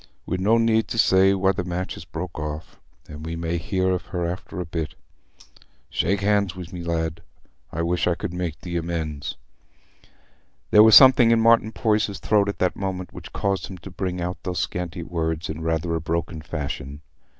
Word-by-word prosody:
We'n 90 Hz, +2 st, -2 dB
no 110 Hz, +4 st, +4 dB
need 115 Hz, -1 st, +2 dB
to -, -, -4 dB
say 95 Hz, -2 st, +5 dB
why 95 Hz, 0 st, +3 dB
the 90 Hz, -, -3 dB
match 90 Hz, +1 st, -3 dB
is -, -, -10 dB
broke 85 Hz, 0 st, -6 dB
off, 75 Hz, +1 st, -6 dB, 0.3 s
an' 75 Hz, 0 st, -9 dB
we 80 Hz, +1 st, -5 dB
may 85 Hz, +1 st, -2 dB
hear 95 Hz, +2 st, 0 dB
of 90 Hz, -, -2 dB
her 90 Hz, -2 st, -2 dB
after 90 Hz, +2 st, -5 dB
a 90 Hz, -, -3 dB
bit. 80 Hz, -2 st, -4 dB, 1.0 s
Shake 95 Hz, +4 st, 0 dB
hands 100 Hz, -2 st, +2 dB
wi' 90 Hz, -1 st, -6 dB
me, 90 Hz, -, -5 dB
lad: 85 Hz, -1 st, -2 dB, 0.5 s
I 85 Hz, -, -2 dB
wish 85 Hz, 0 st, 0 dB
I 85 Hz, -, +2 dB
could 90 Hz, -, -5 dB
make 85 Hz, -3 st, -4 dB
thee 85 Hz, -1 st, -3 dB
amends." 80 Hz, -5 st, -3 dB, 1.3 s
There 105 Hz, -, +8 dB
was 110 Hz, 0 st, +8 dB
something 130 Hz, -3 st, +8 dB
in 115 Hz, 0 st, +4 dB
Martin 115 Hz, -1 st, +4 dB
Poyser's 105 Hz, -2 st, 0 dB
throat 105 Hz, -2 st, +2 dB
at 100 Hz, -, -4 dB
that 90 Hz, -, +1 dB
moment 95 Hz, -2 st, -4 dB
which -, -, -10 dB
caused 100 Hz, -1 st, -1 dB
him 95 Hz, -, -9 dB
to 90 Hz, +2 st, -11 dB
bring 90 Hz, -1 st, -3 dB
out 90 Hz, +1 st, -4 dB
those 90 Hz, -1 st, -4 dB
scanty 90 Hz, -1 st, -3 dB
words 80 Hz, -1 st, -2 dB
in 80 Hz, +1 st, -7 dB
rather 80 Hz, +1 st, -1 dB
a 80 Hz, -, -1 dB
broken 85 Hz, 0 st, -3 dB
fashion. 70 Hz, -2 st, -5 dB
90 Hz, 195 wpm, -24 LUFS, 80-95 Hz, 1.3 s, There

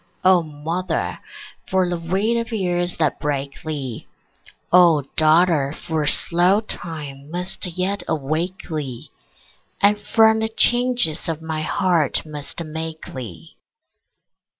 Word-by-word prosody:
O 185 Hz, -1 st, +6 dB
mother, 160 Hz, +4 st, -3 dB, 0.5 s
for 185 Hz, -1 st, +2 dB
the 175 Hz, -1 st, -2 dB
weight 190 Hz, +7 st, 0 dB
of 230 Hz, 0 st, -2 dB
years 175 Hz, -4 st, -1 dB
that -, -, 0 dB
break 140 Hz, -1 st, -3 dB
thee! 140 Hz, -7 st, -5 dB, 0.6 s
O 170 Hz, -5 st, +6 dB
daughter, 155 Hz, -2 st, +3 dB
for 155 Hz, -2 st, -3 dB
slow 175 Hz, +6 st, +4 dB
time 150 Hz, -9 st, -7 dB
must 180 Hz, +2 st, -1 dB
yet 195 Hz, +2 st, 0 dB
awake 160 Hz, +5 st, -2 dB
thee, 145 Hz, -7 st, -5 dB, 0.7 s
And 205 Hz, +1 st, +4 dB
from 220 Hz, 0 st, +4 dB
the 220 Hz, 0 st, 0 dB
changes 240 Hz, -8 st, +1 dB
of 160 Hz, -2 st, -2 dB
my 160 Hz, -1 st, -3 dB
heart 165 Hz, -3 st, +1 dB
must 150 Hz, +2 st, -6 dB
make 160 Hz, 0 st, -6 dB
thee! 85 Hz, -, -9 dB
165 Hz, 120 wpm, -21 LUFS, 150-185 Hz, 0.7 s, O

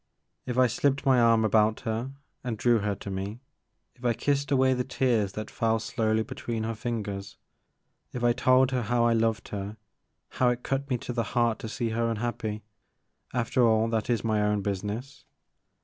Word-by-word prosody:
If 125 Hz, -1 st, -2 dB
I 130 Hz, -, +6 dB
slipped 135 Hz, +4 st, 0 dB
my 130 Hz, -2 st, +5 dB
arm 115 Hz, -1 st, +4 dB
about 110 Hz, 0 st, +3 dB
her 115 Hz, +3 st, -2 dB, 0.3 s
and 120 Hz, -4 st, -3 dB
drew 120 Hz, 0 st, +3 dB
her 100 Hz, -1 st, -1 dB
to 100 Hz, -, -7 dB
me, 100 Hz, +4 st, -4 dB, 0.3 s
— -, -, -49 dB
^if 125 Hz, -, -20 dB
I 120 Hz, -1 st, +3 dB
kissed 140 Hz, +2 st, 0 dB
away 130 Hz, -2 st, +4 dB
the 125 Hz, 0 st, 0 dB
tears 120 Hz, -6 st, 0 dB
that 110 Hz, 0 st, -6 dB
fell 115 Hz, -1 st, +1 dB
slowly 110 Hz, -1 st, 0 dB
be -, -, -8 dB
tween 115 Hz, -2 st, -4 dB
her 115 Hz, +1 st, -2 dB
fingers, 105 Hz, -4 st, -4 dB, 0.4 s
— -, -, -49 dB
if 125 Hz, -, -5 dB
I 120 Hz, 0 st, +4 dB
told 130 Hz, +1 st, +4 dB
her 130 Hz, -1 st, 0 dB
how 120 Hz, +1 st, +1 dB
I 120 Hz, -, +4 dB
loved 115 Hz, 0 st, 0 dB
her 100 Hz, +1 st, -5 dB, 0.3 s
— -, -, -35 dB
^how 125 Hz, -1 st, +4 dB
it 125 Hz, 0 st, -4 dB
cut 135 Hz, +1 st, -2 dB
me 125 Hz, -, +1 dB
to 125 Hz, -, -6 dB
the 120 Hz, -, 0 dB, 0.2 s
heart 120 Hz, -2 st, +2 dB
to 110 Hz, -, -6 dB
see 115 Hz, +1 st, -2 dB
her 115 Hz, +1 st, 0 dB
unhappy, 110 Hz, -1 st, -3 dB, 0.4 s
— -, -, -50 dB, 0.3 s
after 125 Hz, +1 st, +2 dB
all 110 Hz, -1 st, +4 dB
that 110 Hz, -1 st, -1 dB
is 115 Hz, -3 st, +1 dB
my 110 Hz, -2 st, +1 dB
own 105 Hz, -1 st, +1 dB
business. 105 Hz, +7 st, -4 dB
115 Hz, 210 wpm, -27 LUFS, 110-125 Hz, 0.4 s, I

